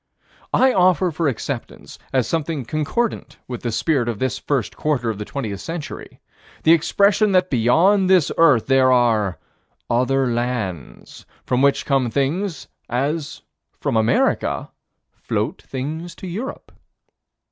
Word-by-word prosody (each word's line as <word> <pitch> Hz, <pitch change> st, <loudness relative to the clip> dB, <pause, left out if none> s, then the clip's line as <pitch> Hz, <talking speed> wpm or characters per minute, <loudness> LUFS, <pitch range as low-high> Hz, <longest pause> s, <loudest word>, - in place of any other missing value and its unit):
I 260 Hz, 0 st, +4 dB
offer 185 Hz, -1 st, +3 dB
for 160 Hz, 0 st, -1 dB
acceptance, 130 Hz, -1 st, -5 dB
as 130 Hz, -4 st, +1 dB
something 160 Hz, -4 st, -2 dB
concordant 160 Hz, -, -2 dB
with 125 Hz, -2 st, -6 dB
the 120 Hz, -, -2 dB
spirit 120 Hz, +1 st, 0 dB
of 115 Hz, -, -3 dB
this 130 Hz, -1 st, -2 dB
first 130 Hz, -9 st, -2 dB
quarter 125 Hz, -7 st, 0 dB
of 105 Hz, -, -7 dB
the 105 Hz, -, -4 dB
20th 110 Hz, -8 st, -5 dB
century, 165 Hz, -, -7 dB, 0.4 s
the 160 Hz, -, +5 dB
expression 200 Hz, +5 st, +3 dB
that 185 Hz, 0 st, +2 dB
beyond 175 Hz, -, +3 dB
this 185 Hz, -5 st, +4 dB
earth 140 Hz, -6 st, +4 dB
are 120 Hz, -7 st, +3 dB, 0.5 s
other 130 Hz, +3 st, +2 dB
lands 115 Hz, -, -4 dB, 0.2 s
from 125 Hz, 0 st, +1 dB
which 140 Hz, 0 st, +2 dB
come 135 Hz, -4 st, +1 dB
things 155 Hz, -, -2 dB, 0.2 s
as, 145 Hz, +5 st, -2 dB, 0.4 s
from -, -, -1 dB
America, 110 Hz, +1 st, +1 dB, 0.4 s
float -, -, -3 dB
things 155 Hz, +6 st, -6 dB
to -, -, -10 dB
Europe. 210 Hz, +10 st, -6 dB
140 Hz, 130 wpm, -21 LUFS, 120-165 Hz, 0.5 s, the